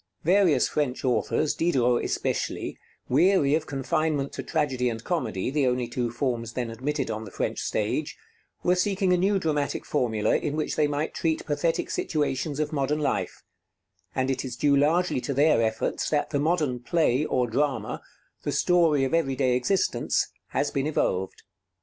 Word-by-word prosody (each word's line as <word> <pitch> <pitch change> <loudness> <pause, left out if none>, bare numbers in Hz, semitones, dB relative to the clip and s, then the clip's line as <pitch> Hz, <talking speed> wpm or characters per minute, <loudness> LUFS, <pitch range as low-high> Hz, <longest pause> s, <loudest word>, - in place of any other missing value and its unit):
Various 180 -2 +4
French 140 -3 -2
authors, 130 +4 +1
Diderot 125 -8 +2
especially, - - -2 0.3
weary 150 +1 +4
of 155 0 0
confinement 140 +1 -1
to - - -4
tragedy 135 -6 0
and 115 -1 -5
comedy, 155 - -2
the 140 -2 +2
only 125 -1 0
two 120 0 -2
forms 120 -1 -2
then 120 -2 -3
admitted 135 +2 -2
on 110 0 -4
the 105 - -8
French - - -3
stage, - - -2 0.5
were 180 - +4
seeking 190 0 +1
a - - +3
new 195 +3 +2
dramatic 150 -5 -1
formula 115 -7 +1
in 150 -1 -1
which 155 - -2
they 150 - +3
might 145 +2 -2
treat 160 -1 -1
pathetic 155 +2 -1
situations 145 -1 -1
of 155 0 -1
modern 145 +1 0
life; 150 - -2 0.7
and 130 +1 +1
it 130 -1 -2
is 130 -3 -5
due 140 +2 +3
largely 155 +1 +2
to 140 - -3
their 145 -3 +4
efforts 110 -1 -1
that 150 -1 0
the 145 - 0
modern 150 -5 +1
"play" 145 0 +1
or 125 -4 +1
"drama," 135 +4 -1 0.4
the - - -2
story 165 -6 +3
of 135 - -1
every 140 -5 +1
day 130 -2 +2
existence, 185 +10 +1 0.2
has 145 - -1
been 140 +1 -1
evolved. 95 -11 -1
145 Hz, 170 wpm, -26 LUFS, 125-155 Hz, 0.7 s, Various